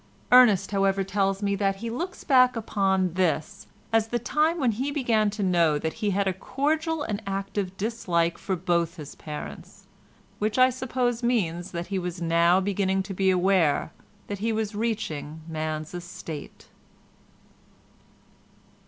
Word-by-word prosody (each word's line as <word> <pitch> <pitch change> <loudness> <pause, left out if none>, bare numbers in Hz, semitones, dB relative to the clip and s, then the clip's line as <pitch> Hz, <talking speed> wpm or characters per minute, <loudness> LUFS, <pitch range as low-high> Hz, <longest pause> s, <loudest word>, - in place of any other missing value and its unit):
Ernest, 215 -7 +6
however, 195 -1 +2
tells 195 +1 0
me 200 0 +1
that 195 0 +1
he 230 +4 -5
looks 350 +10 -5
back 255 -3 +5
upon 190 -5 0
this 180 +1 -1 0.3
as 225 -1 +3
the 240 - -1
time 305 +8 +1
when 255 -5 +2
he 255 +6 -2
began 235 -7 +1
to 205 0 -4
know 170 -5 +3
that 160 +2 -3
he 210 - +1
had 200 0 +1
a 190 - +1
cordial 305 - -1
and 210 -4 -3
active 195 -1 -3
dislike 180 -6 0
for 190 - -2
both 170 -1 0
his 150 -4 -9
parents, 150 -1 -9 0.5
which 215 +2 -1
I 255 0 +6
suppose 250 -1 -1
means 185 -8 0
that 170 0 -4
he 190 - +1
was 180 -1 -4
now 170 +2 +3
beginning 190 0 0
to 195 +1 -6
be 190 0 +2
aware 180 -5 +2 0.3
that 200 -1 -5
he 225 +3 0
was 220 -1 -2
reaching 180 -9 -3
man's 155 -1 -4
estate. 170 -4 -8
195 Hz, 155 wpm, -26 LUFS, 175-230 Hz, 0.5 s, Ernest